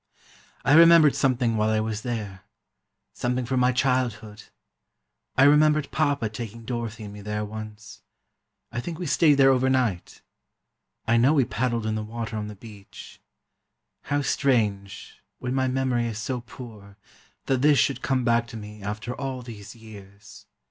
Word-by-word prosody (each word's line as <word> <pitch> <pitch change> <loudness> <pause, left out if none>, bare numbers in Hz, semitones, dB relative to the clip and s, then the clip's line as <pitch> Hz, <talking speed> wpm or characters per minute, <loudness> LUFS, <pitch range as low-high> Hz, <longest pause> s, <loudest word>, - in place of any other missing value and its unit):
"I 135 - +4
remembered 165 -2 +7
something 125 -4 +1
while 110 0 +1
I 110 0 +1
was 110 -1 -3
there: 105 -6 -5 0.7
something 125 0 -2
from 130 +2 0
my 125 0 +3
childhood: 120 -5 -1 0.9
I 135 - +6
remembered 150 0 +4
Papa 145 -6 0
taking 115 +1 -8
Dorothy 115 -2 -5
and 100 -1 -8
me 105 - -10
there, 105 +1 -3
once; 105 0 -9 0.7
I 120 - -3
think 165 +4 -6
we 180 - -5
stayed 150 0 +4
there 135 -1 +5
overnight. 130 -7 0 0.8
I 115 +1 +3
know 130 +6 +4
we 135 -4 +3
paddled 120 -2 -2
in 110 - -1
the 110 - -2
water 115 +1 -6
on 105 -1 -4
the 105 - -8
beach. 100 -1 -13 0.8
How 145 0 -1
strange, 105 -9 -1 0.2
when 125 0 -4
my 130 -1 +1
memory 130 -2 0
is 110 -2 -5
so 120 +3 -3
poor, 105 -6 -12 0.5
that 130 -2 0
this 145 0 +5
should 140 - +1
come 130 -2 0
back 115 -1 +2
to 115 - -9
me, 105 0 -10
after 105 +4 -5
all 130 -2 -5
these 105 -3 -10
years. 105 -2 -14
120 Hz, 160 wpm, -25 LUFS, 105-130 Hz, 0.9 s, remembered